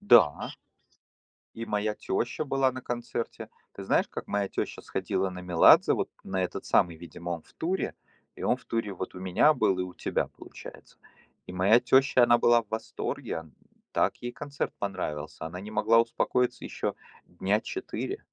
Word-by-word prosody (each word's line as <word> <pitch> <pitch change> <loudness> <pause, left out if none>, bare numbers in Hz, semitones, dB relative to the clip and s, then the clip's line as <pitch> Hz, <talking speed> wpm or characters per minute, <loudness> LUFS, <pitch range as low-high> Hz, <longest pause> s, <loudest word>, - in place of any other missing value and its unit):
Да. 120 - +5 1.0
И 115 0 -5
моя 105 0 0
тёща 120 +6 -2
была 135 -2 +2
на 130 - -6
концерте. 120 -1 -4 0.2
Ты 100 - -8
знаешь, - - +2
как - - -6
моя 100 -1 0
тёща - - -4
сходила 95 - -1
на 90 0 -7
Меладзе? 90 -2 +6
Вот - - -1
на 95 -1 -1
этот 90 - -4
самый, 85 -2 +3
видимо, 85 +1 -8
он 85 -2 -3
в - - -24
туре. 180 +4 -2 0.4
И - - -9
он - - +2
в - - -20
туре 115 -3 -2
вот 95 0 -6
у 90 - -8
меня 95 +11 +4
был 95 -1 +2
и - - +1
у 90 -1 -7
тебя, - - -1
получается. - - -13 0.5
И 90 - -8
моя 100 +6 +5
тёща, 130 0 +4
она 120 0 +6
была 120 0 +5
в 110 - -29
восторге. 110 -6 -3
Он 80 -2 -15 0.4
так - - +2
ей 120 0 -4
концерт 145 +1 -4
понравился. 90 -7 -4
Она 90 +3 -6
не 105 +2 -8
могла 115 +2 +4
успокоиться 125 +2 0
ещё - - -3 0.3
дня 95 +4 0
4. 380 - -4
105 Hz, 175 wpm, -28 LUFS, 90-120 Hz, 1.0 s, Меладзе